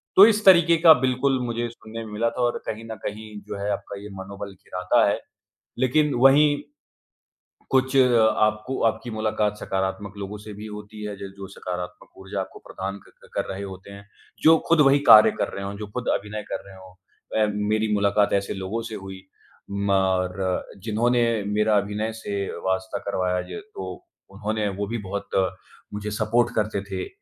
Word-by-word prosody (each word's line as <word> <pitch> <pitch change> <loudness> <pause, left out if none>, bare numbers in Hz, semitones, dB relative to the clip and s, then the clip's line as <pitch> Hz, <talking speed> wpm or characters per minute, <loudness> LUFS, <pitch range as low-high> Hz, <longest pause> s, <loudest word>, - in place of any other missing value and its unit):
तो 195 - +11
इस 215 -1 +3
तरीके 170 -3 +7
का 160 - +12
बिल्कुल 130 +1 +1
मुझे 120 0 -2
सुनने 115 0 -9
में 110 - -10
मिला 115 +2 +1
था 115 - -5
और 120 -1 +1
कहीं 110 +1 -4
न - - -4
कहीं 110 +1 -5 0.2
जो - - -5
है 100 +1 -2
आपका 100 0 -5
ये 105 - -9
मनोबल 100 +1 -7
गिराता 90 +4 +1
है। 100 - +1 0.6
लेकिन 145 +3 +2
वहीं, 145 +4 +5 1.1
कुछ 130 0 +2
आपको 110 -1 +3
आपकी 115 +2 0
मुलाकात 110 -1 -1
सकारात्मक 95 0 -3
लोगों 100 +1 -6
से 105 +1 -10
भी 105 +1 -9
होती 105 0 -9
है 105 -1 -4
ज 100 - -7
जो 100 0 -7
सकारात्मक 90 0 -7
ऊर्जा 95 +1 -5
आपको - - -9
प्रदान 100 +1 -5
क - - -21
कर - - 0
रहे 95 - -6
होते 95 0 -9
हैं। 100 0 -11 0.4
जो 160 +1 +8
खुद 165 -2 +5
वही 140 0 +5
कार्य 110 - +9
कर - - 0
रहे 100 - -5
हों, 100 +1 -5
जो 105 0 -6
खुद 125 +4 -5
अभिनय 105 +1 -3
कर - - -3
रहे 100 - -12
हों। 95 -1 -14 0.5
अ, - - +3 0.2
मेरी 110 0 +1
मुलाकात 100 0 +2
ऐसे 100 0 0
लोगों 95 +4 -3
से 110 - -6
हुई 95 -1 -8 0.5
म 100 0 -1 0.5
र 95 -1 -1 0.2
जिन्होंने 120 +3 +2 0.3
मेरा 105 +1 +2
अभिनय 105 +2 -1
से 105 -2 -5 0.3
वास्ता 95 +1 -1
करवाया 90 -2 0
ज 215 - -6
तो 95 -1 -5 0.4
उन्होंने 105 +2 -2
वो 100 0 -2
भी 115 +3 -3
बहुत 100 +1 -5 0.6
मुझे 105 0 -4
सपोर्ट 115 +2 +1
करते 105 -2 0
थे, 95 -2 -5
105 Hz, 180 wpm, -24 LUFS, 100-115 Hz, 1.1 s, का